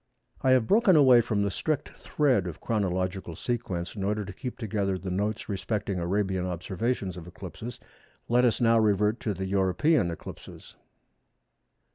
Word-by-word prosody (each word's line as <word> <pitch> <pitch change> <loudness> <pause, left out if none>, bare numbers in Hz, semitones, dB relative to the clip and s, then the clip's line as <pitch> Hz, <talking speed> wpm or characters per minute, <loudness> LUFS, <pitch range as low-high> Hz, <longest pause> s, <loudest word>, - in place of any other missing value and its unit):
I 130 - +2
have 125 -3 +3
broken 205 - +4
away 130 -5 +7
from 110 -3 0
the 100 - 0
strict 150 - -2
thread 130 -11 0
of 85 - -7
chronological 95 -4 -2
sequence 105 -6 -3
in 100 - -4
order 105 +1 -1
to 100 - -8
keep 125 +5 -6
together 100 -4 -1
the 95 0 -5
notes 105 +4 -2
respecting 100 -1 -2
Arabian 95 +1 0
observations 95 +2 -2
of 85 -1 -9
eclipses. 105 +7 -8 0.5
Let 120 +1 +3
us 120 -3 +2
now 115 -2 +4
revert 105 +1 +2
to 105 -3 -2
the 95 +1 -3
European 95 - +2
eclipses. 85 - -10
105 Hz, 155 wpm, -27 LUFS, 95-120 Hz, 0.5 s, away